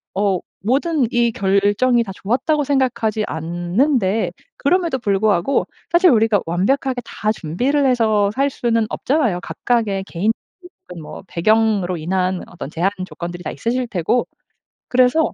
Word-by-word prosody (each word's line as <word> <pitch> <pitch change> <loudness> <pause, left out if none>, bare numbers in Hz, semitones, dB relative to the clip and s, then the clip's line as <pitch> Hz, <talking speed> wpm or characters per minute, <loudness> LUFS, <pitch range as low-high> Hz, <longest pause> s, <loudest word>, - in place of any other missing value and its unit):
어 195 -2 +1 0.3
모든 280 +4 +2
이 235 -1 +2
결정이 205 +5 +2
다 200 - -7
좋았다고 265 +10 0
생각하지 245 -6 0
않는데 185 - 0 0.2
그럼에도 335 -1 +1
불구하고 205 +1 +1 0.3
사실 355 +1 +5
우리가 225 -5 +3
완벽하게 245 +9 0
다 215 -1 -2
준비를 250 - 0
해서 220 -5 +2
살 275 +4 +1
수는 230 -4 0
없잖아요. 245 - 0
각각의 210 -5 -1
개인적인 220 - -5
뭐 150 - -9
배경으로 200 -1 +1
인한 185 +3 -1
어떤 175 -5 -8
제한 175 +5 0
조건들이 175 -1 -7
다 - - -4
있으실 245 +2 -2
테고 215 +4 0 0.6
그래서 255 +5 +3
220 Hz, 315 characters per minute, -19 LUFS, 190-255 Hz, 0.6 s, 사실